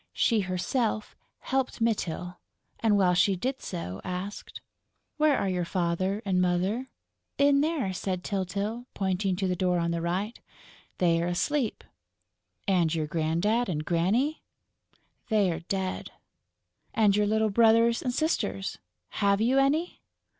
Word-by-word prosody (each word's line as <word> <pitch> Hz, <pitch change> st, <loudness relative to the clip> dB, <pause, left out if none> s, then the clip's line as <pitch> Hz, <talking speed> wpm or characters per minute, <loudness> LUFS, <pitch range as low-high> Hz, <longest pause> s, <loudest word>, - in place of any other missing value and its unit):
She 230 Hz, -3 st, +2 dB
herself 210 Hz, +4 st, -1 dB, 0.3 s
helped 265 Hz, -1 st, -1 dB
Mytyl 180 Hz, -6 st, -1 dB, 0.4 s
and, 215 Hz, -3 st, +3 dB
while 185 Hz, -2 st, +4 dB
she 190 Hz, +2 st, +3 dB
did 260 Hz, +8 st, -3 dB
so, 95 Hz, -, -5 dB
asked: 185 Hz, +3 st, -6 dB, 0.6 s
"Where 300 Hz, -2 st, +4 dB
are -, -, 0 dB
your 180 Hz, -2 st, 0 dB
Father 185 Hz, +4 st, -1 dB
and 185 Hz, -2 st, +2 dB
Mother?" 185 Hz, +8 st, 0 dB, 0.5 s
"In 280 Hz, 0 st, +4 dB
there," 295 Hz, -, 0 dB
said 185 Hz, -1 st, -3 dB
Tyltyl, 200 Hz, +5 st, -3 dB
pointing 190 Hz, 0 st, 0 dB
to 190 Hz, +1 st, -1 dB
the 180 Hz, -, 0 dB
door 180 Hz, 0 st, +1 dB
on 170 Hz, 0 st, 0 dB
the 170 Hz, 0 st, -1 dB
right. 190 Hz, +7 st, -2 dB, 0.6 s
"They're 170 Hz, -1 st, +2 dB
asleep." 225 Hz, +8 st, -1 dB, 0.8 s
"And 175 Hz, -5 st, +2 dB
your 155 Hz, -2 st, 0 dB
Grandad 170 Hz, +9 st, 0 dB
and 155 Hz, -3 st, -2 dB
Granny?" 215 Hz, -, +1 dB, 0.9 s
"They're 200 Hz, -7 st, +2 dB
dead...." 190 Hz, +1 st, -3 dB, 0.9 s
"And 210 Hz, -3 st, +4 dB
your 210 Hz, 0 st, +2 dB
little 220 Hz, 0 st, +2 dB
brothers 230 Hz, +2 st, +4 dB
and 250 Hz, -, -1 dB
sisters.... 235 Hz, -9 st, -1 dB, 0.4 s
Have 200 Hz, 0 st, +3 dB
you 250 Hz, +5 st, +3 dB
any?..." 300 Hz, +6 st, +1 dB
195 Hz, 130 wpm, -28 LUFS, 180-230 Hz, 0.9 s, while